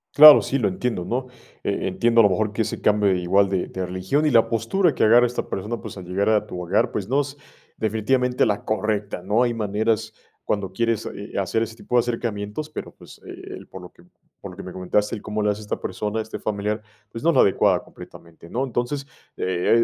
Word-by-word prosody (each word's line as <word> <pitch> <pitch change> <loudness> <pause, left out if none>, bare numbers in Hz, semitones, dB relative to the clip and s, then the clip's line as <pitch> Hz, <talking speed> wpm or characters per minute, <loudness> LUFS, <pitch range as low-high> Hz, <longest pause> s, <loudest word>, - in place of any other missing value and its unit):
Claro, 150 0 +11
sí, 135 - -1
lo 110 -6 +1
entiendo, 95 -1 -2
¿no? 130 +2 -2 0.4
E - - -1
entiendo 115 +5 +3
a - - +5
lo 100 - +5
mejor 105 +3 0
que 110 +2 0
ese - - -5
cambio 105 -2 +3
igual 95 +2 +2
de 95 -2 -1
de 95 -1 -4
religión, 95 +12 -1
y 150 - +3
la 115 -1 +4
postura 145 - +1
que - - +1
agarra 120 +3 +6
esta 120 - -4
persona, 105 +4 -3
pues, - - -9
al 95 - -8
llegar 95 +4 0
a 105 -1 +2
tu 90 - -6
hogar, 90 +4 +1
pues, 100 -3 -3
no 135 +5 +2
es 145 0 -7 0.4
definitivamente 125 +4 +1
la 105 -2 -1
correcta, 105 -2 -2
¿no? 105 +6 +2
Hay 120 - +1
maneras 110 +1 -1 0.3
cuando 100 -2 -2
quieres, 115 0 0
eh 100 +1 -7
eh, - - -2
hacer 100 +4 0
ese 115 0 -3
tipo 125 - -4
de 120 - +7
acercamientos, 115 +3 -3
pero, - - -6
pues, - - -16
eh - - -9 0.3
eh, - - -13
por 95 - -10
lo 90 - -11
que - - -20 0.4
por 100 - -8
lo 90 - -13
que 100 - -7
me 90 - -8
comentaste, 95 +4 -1
el 105 - -8
cómo 105 0 -3
le 105 - +3
hace 105 +1 -5
esta 105 - -4
persona, 105 +1 -3
este 110 - -7
familiar, 105 0 -2 0.3
pues, 115 - -7
no 170 - +4
es - - +2
la - - +7
adecuada 95 - +3
completamente, 85 0 -14
¿no? 125 - -1
Entonces, 135 +3 -2 0.3
eh 95 +5 +2
105 Hz, 235 wpm, -23 LUFS, 100-120 Hz, 0.4 s, Claro